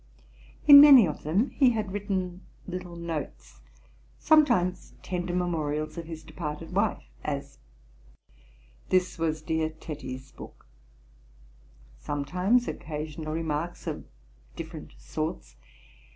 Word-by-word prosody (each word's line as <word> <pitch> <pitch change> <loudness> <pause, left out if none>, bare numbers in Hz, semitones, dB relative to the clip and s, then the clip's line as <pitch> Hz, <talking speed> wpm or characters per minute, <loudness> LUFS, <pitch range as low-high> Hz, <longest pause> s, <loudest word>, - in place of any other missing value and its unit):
In 285 -1 +12
many 275 -9 +9
of 150 - -5
them 190 - 0
he 265 -3 +4
had 215 -4 -3
written 190 -3 -3 0.3
little 180 -1 -6
notes: 65 - -6 0.6
sometimes 235 - +2
tender 175 -1 -3
memorials 155 -4 -2
of 170 -1 -6
his 160 -1 -8
departed 160 +1 -6
wife; 205 +1 +1 0.2
as, 140 -2 -5 1.3
'This 185 -1 +1
was 160 -1 -1
dear 160 0 0
Tetty's 135 -4 -8
book:' - - -13 1.3
sometimes 180 - 0
occasional 155 +1 -5
remarks 160 +1 -3
of - - -4 0.5
different - - -8
sorts. 60 0 -5
165 Hz, 105 wpm, -27 LUFS, 150-185 Hz, 1.3 s, In